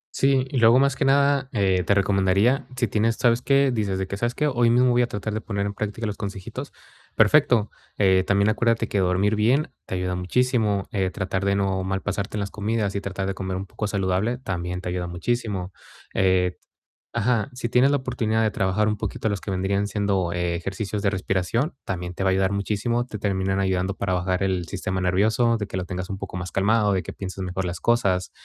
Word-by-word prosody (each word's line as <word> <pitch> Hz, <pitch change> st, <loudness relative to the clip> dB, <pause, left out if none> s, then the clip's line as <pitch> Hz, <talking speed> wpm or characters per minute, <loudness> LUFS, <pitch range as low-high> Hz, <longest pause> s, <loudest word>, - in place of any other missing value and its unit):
Sí. 135 Hz, -1 st, +3 dB
Y 130 Hz, -, 0 dB
luego, 115 Hz, +2 st, +6 dB
más 140 Hz, 0 st, +3 dB
que 140 Hz, -, 0 dB
nada, 140 Hz, -1 st, +3 dB
eh, 95 Hz, -3 st, +2 dB
te 100 Hz, -, +2 dB
recomendaría, 100 Hz, +7 st, +2 dB
si 120 Hz, -3 st, 0 dB
tienes, 110 Hz, +2 st, +1 dB
¿sabes 120 Hz, 0 st, +2 dB
qué? 140 Hz, 0 st, +3 dB
Dices 105 Hz, -5 st, -1 dB
de 95 Hz, -, -1 dB
que: 100 Hz, -, -4 dB
"¿Sabes 120 Hz, +4 st, -2 dB
qué? 150 Hz, -, 0 dB
Hoy 120 Hz, -4 st, +2 dB
mismo 125 Hz, +2 st, +4 dB
voy 120 Hz, 0 st, +3 dB
a 120 Hz, -, +2 dB
tratar 105 Hz, 0 st, -4 dB
de 110 Hz, -, -2 dB
poner 100 Hz, -2 st, -2 dB
en 100 Hz, -, -3 dB
práctica 105 Hz, +2 st, -4 dB
los 105 Hz, -1 st, -3 dB
consejitos", 100 Hz, -2 st, -6 dB, 0.4 s
perfecto. 115 Hz, -1 st, +4 dB, 0.3 s
Eh, 95 Hz, -2 st, +4 dB
también 100 Hz, +1 st, +2 dB
acuérdate 115 Hz, +1 st, +1 dB
que 100 Hz, -, -1 dB
dormir 95 Hz, +3 st, +2 dB
bien 125 Hz, +8 st, +2 dB, 0.2 s
te 95 Hz, -, -3 dB
ayuda 90 Hz, 0 st, -2 dB
muchísimo, 105 Hz, +1 st, +1 dB
eh, 95 Hz, -2 st, 0 dB
tratar 95 Hz, 0 st, -3 dB
de 100 Hz, -, +2 dB
no 95 Hz, -1 st, 0 dB
malpasarte 100 Hz, +2 st, -3 dB
en -, -, -1 dB
las 100 Hz, -, -4 dB
comidas 105 Hz, -1 st, -1 dB
y 100 Hz, -, -2 dB
tratar 95 Hz, 0 st, -4 dB
de 95 Hz, -, -1 dB
comer 95 Hz, -1 st, -4 dB, 0.3 s
saludable, 100 Hz, +4 st, 0 dB
también 90 Hz, -6 st, -4 dB
te 90 Hz, -, -4 dB
ayuda 90 Hz, -1 st, -3 dB
muchísimo. 95 Hz, 0 st, -2 dB, 0.4 s
Eh, 95 Hz, -1 st, +2 dB, 0.6 s
ajá. 115 Hz, +1 st, +1 dB
Si 125 Hz, -1 st, -3 dB
tienes 125 Hz, +3 st, +4 dB
la 145 Hz, -, +3 dB
oportunidad 115 Hz, -4 st, -1 dB
de 110 Hz, -, +1 dB
trabajar 100 Hz, +2 st, +1 dB
un 105 Hz, -, +1 dB
poquito 110 Hz, -, -3 dB
los 100 Hz, -3 st, -1 dB
que -, -, -6 dB
vendrían 100 Hz, +2 st, 0 dB
siendo 100 Hz, -4 st, 0 dB
ejercicios 90 Hz, +4 st, -2 dB
de 100 Hz, -, +2 dB
respiración, 95 Hz, -, -1 dB
también 90 Hz, -2 st, -4 dB
te 95 Hz, -, -4 dB
va 95 Hz, -, +3 dB
ayudar 95 Hz, +1 st, +2 dB
muchísimo, 110 Hz, +4 st, -1 dB
te 110 Hz, -, -6 dB
terminan 95 Hz, -1 st, -1 dB
ayudando 95 Hz, 0 st, 0 dB
para 100 Hz, -2 st, -2 dB
bajar 90 Hz, +2 st, 0 dB
el 95 Hz, -3 st, 0 dB
sistema 95 Hz, 0 st, -3 dB
nervioso, 110 Hz, +6 st, +2 dB
de 105 Hz, -, -3 dB
que 95 Hz, -, -5 dB
lo 90 Hz, -, -3 dB
tengas 90 Hz, +1 st, -5 dB
un 95 Hz, -, -4 dB
poco 95 Hz, -2 st, -6 dB
más 90 Hz, 0 st, -5 dB
calmado, 105 Hz, +1 st, +2 dB
de 95 Hz, -, +1 dB
que -, -, -8 dB
pienses 95 Hz, 0 st, -6 dB
mejor 90 Hz, +1 st, -3 dB
las 90 Hz, +1 st, -4 dB
cosas, 100 Hz, -6 st, +1 dB
100 Hz, 210 wpm, -24 LUFS, 95-115 Hz, 0.6 s, luego